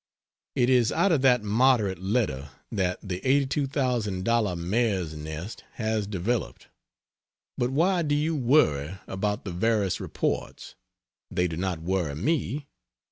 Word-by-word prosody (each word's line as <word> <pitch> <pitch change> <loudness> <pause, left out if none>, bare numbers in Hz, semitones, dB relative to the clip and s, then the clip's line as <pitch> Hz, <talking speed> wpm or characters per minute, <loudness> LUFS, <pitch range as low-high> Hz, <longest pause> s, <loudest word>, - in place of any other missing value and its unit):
It 120 - +3
is 125 -3 +4
out 200 - +2
of 155 -5 +3
that 125 -4 +4
moderate 105 -3 +3
letter 95 - -1 0.2
that 90 -1 0
the 90 0 -4
Eighty 140 +1 +3
Two 135 +1 -1
Thousand 120 - -1
Dollar 115 -6 +2
mare's 95 -1 0
nest 80 +6 -7
has 110 -2 -1
developed. 105 +4 -3 0.9
But 120 - 0
why 175 +7 +2
do 145 -2 +1
you 155 +2 0
worry 95 - +2
about 105 +2 -2
the 95 - -4
various 100 +1 +1
reports? - - -3 0.6
They 90 0 +1
do 80 - -4
not 90 -2 -2
worry 90 -5 -1
me. 145 - -1
105 Hz, 140 wpm, -27 LUFS, 90-130 Hz, 0.9 s, is